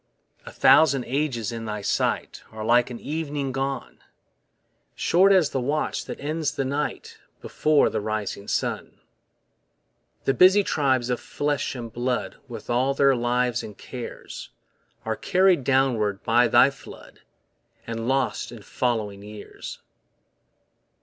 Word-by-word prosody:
A - - -7
thousand 140 -5 +5
ages 130 -5 -1
in 115 -1 -5
thy 105 -1 -4
sight - - -1
Are 110 -1 -6
like 120 +1 +4
an 120 -2 -7
evening 145 -3 -3
gone; 135 +1 -4 1.0
Short 190 +3 +4
as 180 -7 +4
the 130 - -1
watch 145 +5 -1
that - - -7
ends 155 +1 -2
the 135 - -1
night 145 +2 -3 0.2
Before 150 -1 +2
the 110 - -2
rising 105 -1 -4
sun. - - -3 1.2
The 135 - +2
busy 185 +8 +6
tribes 130 -7 +1
of 125 - -1
flesh 145 -2 -2
and 115 -3 -7
blood 125 +1 -2
With 120 - -9
all 130 +3 +1
their 140 -1 +4
lives 120 0 0
and 105 -2 -10
cares 125 -2 -8 0.6
Are 110 0 -1
carried 185 - +3
downwards 120 -7 +1
by 120 +2 +4
thy 120 +4 +5
flood, - - -14 0.7
And 115 0 -4
lost 135 -2 0
in 115 -4 -11
following 110 -4 -2
years. 105 0 -10
125 Hz, 135 wpm, -24 LUFS, 115-140 Hz, 1.2 s, busy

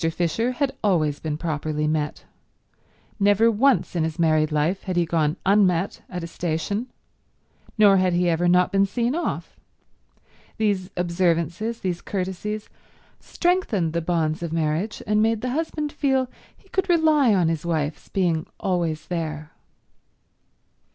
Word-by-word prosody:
Fisher 175 +9 0
had 275 +1 -1
always 155 -8 +1
been 150 -2 -3
properly 155 -1 -2
met. 150 -1 -2 0.9
Never 205 +3 +4
once 250 -1 +2
in 165 - +1
his 160 0 -3
married 155 -2 +2
life 155 +6 0
had 185 -2 -2
he 175 -1 +2
gone 160 0 0
unmet 190 -2 +2
at 180 -2 -5
a - - -4
station, 175 +8 -2 0.9
nor 205 -2 +6
had 185 -1 +2
he 175 +1 +2
ever 170 +1 +2
not 180 +1 +4
been 195 0 +3
seen 235 +4 -1
off. 345 +3 -4 1.0
These 200 -4 0
observances, 175 +5 0
these 180 -2 -2
courtesies, 200 +3 -4 0.5
strengthened 290 - 0
the 170 - 0
bonds 160 -1 0
of 170 -2 -4
marriage, 165 +6 -1
and 210 0 +2
made 225 0 +1
the 250 - -2
husband 305 0 -2
feel 265 -4 0 0.3
he - - -26
could 380 0 -1
rely 310 - +4
on 180 -3 +2
his 160 -2 -1
wife's 155 -3 -2
being 170 -4 0
always 170 -4 -1
there. 155 -3 -4
180 Hz, 145 wpm, -23 LUFS, 160-215 Hz, 1.0 s, nor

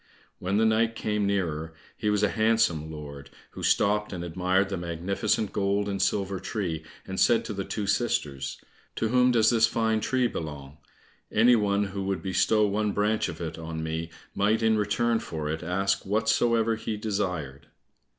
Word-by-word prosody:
When 95 +2 -1
the 110 - +4
knight 110 +1 +2
came 105 -2 -1
nearer 80 -5 -2 0.2
he 105 - -1
was 105 0 +1
a 105 - +4
handsome 110 -8 +2
lord, 70 -2 -9 0.2
who - - -9
stopped 105 +1 +2
and 90 -3 -5
admired 90 +3 +1
the 100 - -2
magnificent 90 +5 -1
gold 100 +1 0
and 100 -1 -2
silver 100 -1 0
tree, 90 -4 -3 0.2
and 95 0 -5
said 110 +5 +4
to 110 - -4
the 100 -1 -3
two 105 - -3
sisters, 100 - -1 0.4
"To 110 - -1
whom 125 +1 +4
does 115 -2 +4
this 115 -1 +4
fine 110 -1 +1
tree 125 +4 +1
belong? 75 - -5 0.5
Any 120 +3 +5
one 100 -2 +2
who 100 0 -4
would 95 -1 -2
bestow 100 +3 +2
one 105 0 0
branch 105 +1 +1
of - - -7
it 80 -1 -5
on 80 0 -5
me 80 +1 -3 0.2
might 110 +3 +1
in 110 0 +4
return 110 +2 +1
for 80 -6 -5
it 80 - -4
ask 95 +3 0
whatsoever 115 +2 +2
he 110 -1 -4
desired." 90 -10 -3
100 Hz, 175 wpm, -27 LUFS, 85-110 Hz, 0.5 s, Any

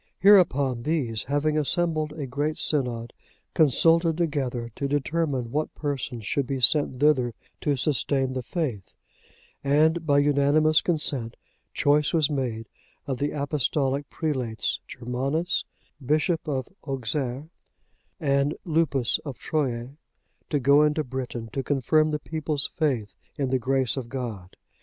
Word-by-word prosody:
Hereupon, 145 - +4
these, 120 -7 -1
having 150 +2 +1
assembled 155 0 0
a 150 -3 -5
great 145 +4 -2
synod, 120 -5 0 0.4
consulted 165 +2 +4
together 130 -8 -2
to 140 - -2
determine 145 -3 -1
what 155 +3 -2
persons 130 -6 -4
should 140 +3 -1
be 135 0 -2
sent 125 +2 +2
thither 130 -6 +3 0.2
to 145 -2 0
sustain 135 -1 0
the 130 - -2
faith, 125 - -4 0.7
and 155 +4 +3
by 145 -3 +3
unanimous 145 +2 +4
consent, 140 -8 0 0.4
choice 145 0 +2
was 155 -2 +2
made 120 -5 -2 0.4
of 135 -3 -3
the 145 - 0
apostolic 140 -1 -1
prelates, 130 -8 -2
Germanus, 135 +8 -2 0.4
Bishop 155 +5 0
of 130 -4 -2 0.2
Auxerre, 135 +2 -2 0.7
and 140 -2 +1
Lupus 150 -7 +1
of 140 -5 -7
Troyes,(93) 130 -3 -2 0.5
to 145 - +1
go 140 +3 +5
into 150 +1 +2
Britain 125 -3 -5
to 135 - -1
confirm 145 +3 +2
the 150 - -1
people's 150 -2 -3
faith 130 - -1 0.2
in 135 -3 -1
the 130 - +2
grace 130 0 +1
of 130 -4 -5
God. 115 -8 -6
140 Hz, 130 wpm, -25 LUFS, 125-155 Hz, 0.7 s, go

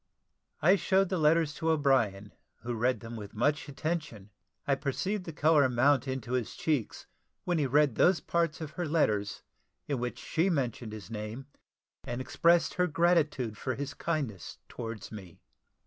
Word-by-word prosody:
I 185 +5 +6
showed 190 -1 +2
the 185 -2 -1
letters 155 0 +3
to 160 +2 -2
O'Brien 130 -10 +1 0.3
who 120 0 -3
read 120 +3 0
them 115 0 -7
with 105 -2 -8
much 145 +7 0
attention. 140 - -4 0.3
I 140 - +2
perceived 180 +8 -2
the 165 - -5
colour 150 -3 +4
mount 130 +2 +3
into 130 -3 -4
his 125 -3 -1
cheeks, 150 -8 -2 0.4
when 175 -2 0
he 145 - +1
read 145 0 +3
those 175 +7 +4
parts 170 0 -1
of 155 -2 -5
her 175 +1 -3
letters 105 -10 0 0.4
in 140 -4 -1
which 125 0 -3
she 170 +4 0
mentioned 125 - -2
his 110 0 -9
name, 110 +4 -5 0.6
and 120 +1 -4
expressed 170 +6 +3
her 180 0 +1
gratitude 155 -9 +1
for 130 -2 -2
his 140 0 -4
kindness 140 - -3
towards 115 -3 -7
me. 95 -6 -10
140 Hz, 165 wpm, -30 LUFS, 115-160 Hz, 0.6 s, I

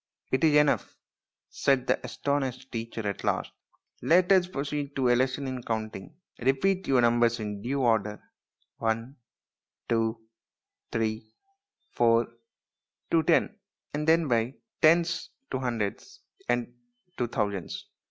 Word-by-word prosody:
" - - -47
It 130 - +2
is 155 -2 +5
enough/' 150 -1 +3 0.5
said 135 -2 +1
the - - 0
astonished 135 -2 -2
teacher 115 -2 -4
at 100 - -4
last. - - 0 0.3
" - - -42
Let 180 +2 +5
us 185 -2 +5
proceed 145 -3 -4
to 130 -2 +2
a 120 - +5
lesson 130 +2 0
in 130 -1 -4
counting. 110 +3 -4 0.2
Repeat 180 +10 +1
your 130 -2 +4
numbers 120 0 +3
in 105 -2 -4
due 135 +5 -1
order 110 -4 +1 0.6
one, 115 +4 -2 0.7
two, 115 0 +1 0.7
three, 110 -1 -2 0.6
four, 115 0 +3 0.8
to 165 - +5
ten, 180 +6 +2 0.3
and 150 +1 -2
then 165 0 +4
by 120 +1 +1 0.3
tens 170 +2 +3 0.2
to 130 - -1
hundreds, 115 -6 -3 0.3
and 120 0 0 0.4
to 120 - 0
thousands." 100 -5 -3
125 Hz, 135 wpm, -28 LUFS, 115-145 Hz, 0.8 s, is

